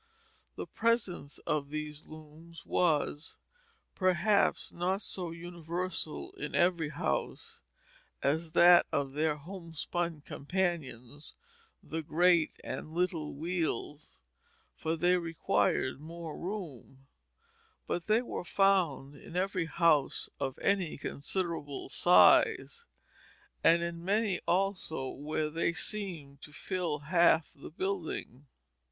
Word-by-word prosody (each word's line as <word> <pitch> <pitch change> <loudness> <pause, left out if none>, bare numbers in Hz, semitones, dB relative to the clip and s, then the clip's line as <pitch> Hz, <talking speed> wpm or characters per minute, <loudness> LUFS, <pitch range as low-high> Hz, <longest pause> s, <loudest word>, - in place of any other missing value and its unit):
The - - -5
presence 210 -11 0
of 150 -2 -1
these 150 0 -5
looms 155 +2 -13
was, 150 -3 0 0.6
perhaps, 185 +2 +2
not 185 +4 -1
so 180 -3 -2
universal 175 - -4
in - - -5
every 175 -3 +2
house 150 - -3 0.6
as 160 +3 0
that 175 0 +7
of 140 -1 -1
their 155 +1 +1
homespun 170 0 -4
companions, 145 -6 -3 0.5
the 160 +1 -4
great 170 +1 +3
and 155 - -6
little 170 -5 -1
wheels, 155 - -3 0.6
for 160 +1 -2
they 175 +2 +3
required 165 -5 0
more 165 0 -7
room; 160 - -7 0.8
but 175 -1 -3
they 220 +3 +3
were 240 - -5
found 175 -8 +2
in 155 - -12
every 185 -1 0
house 160 -4 +2
of 130 - -3
any 195 -5 +1
considerable 145 -1 -3
size, 450 - +5 0.8
and 170 +1 +5
in 170 0 -4
many 200 0 +1
also 180 -7 0
where 150 +1 -3
they 165 +1 0
seemed 170 -9 -4
to 150 - -11
fill 175 -1 -2
half 165 +1 +3
the 145 - -11
building. 165 -7 -4
170 Hz, 110 wpm, -31 LUFS, 150-180 Hz, 0.8 s, that